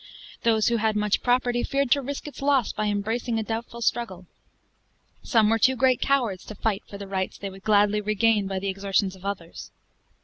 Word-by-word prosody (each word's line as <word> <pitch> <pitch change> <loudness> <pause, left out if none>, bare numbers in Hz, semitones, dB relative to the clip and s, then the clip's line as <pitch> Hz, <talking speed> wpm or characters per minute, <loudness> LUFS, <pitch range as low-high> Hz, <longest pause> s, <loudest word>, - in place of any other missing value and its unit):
Those 225 -1 +3
who 235 - +1
had 220 -1 +1
much 210 -1 +1
property, 245 -1 +1
feared 275 -2 0
to 280 - +4
risk 280 +2 -5
its 295 - -9
loss 275 -5 +2
by 215 - -1
embracing 225 +3 -1
a 220 - -1
doubtful 230 +2 -5
struggle. 190 -7 -1 1.0
Some 225 -5 +3
were 225 +1 +2
too 260 +4 +4
great 255 0 +2
cowards 240 -9 +1
to 215 - -9
fight 205 -1 -1
for 200 - -9
the 200 - -7
rights 190 -1 -3
they 200 -1 -6
would 195 0 -12
gladly 210 0 +3
regain 215 0 +2
by 195 0 -3
the 195 +1 -3
exertions 195 0 0
of 190 0 -14
others. 190 -4 -6
215 Hz, 200 wpm, -25 LUFS, 200-240 Hz, 1.0 s, to